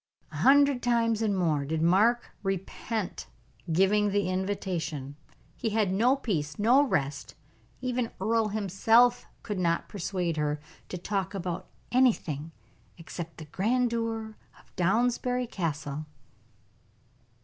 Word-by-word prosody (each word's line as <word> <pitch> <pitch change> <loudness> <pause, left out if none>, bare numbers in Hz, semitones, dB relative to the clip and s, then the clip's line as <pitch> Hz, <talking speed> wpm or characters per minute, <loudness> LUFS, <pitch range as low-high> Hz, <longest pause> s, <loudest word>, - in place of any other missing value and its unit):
A - - -7
hundred 280 -1 +5
times 230 -2 +2
and 205 -3 +1
more 155 -6 +1
did 155 +3 -2
Mark 205 +9 +3
repent 195 +2 -3 0.4
giving 200 +5 +3
the 200 -2 0
invitation; 180 -7 -3 0.4
he 225 - -2
had 210 -3 +1
no 240 +7 +4
peace, 160 - -2
no 240 +7 +5
rest; 145 - -1 0.5
even 250 -2 -1
Earle 220 +3 +2
himself 220 +4 +3 0.2
could 210 -4 -3
not 170 -2 0
persuade 180 -4 -2
her 150 0 0 0.3
to 180 - -4
talk 195 +2 -2
about 180 -2 -4 0.2
anything 165 - +1 0.5
except 165 0 -8
the 155 - -8
grandeur 225 +3 -1 0.2
of - - -25
Downsbury 245 +6 +1
Castle. 155 -7 -4
200 Hz, 115 wpm, -28 LUFS, 170-230 Hz, 0.5 s, hundred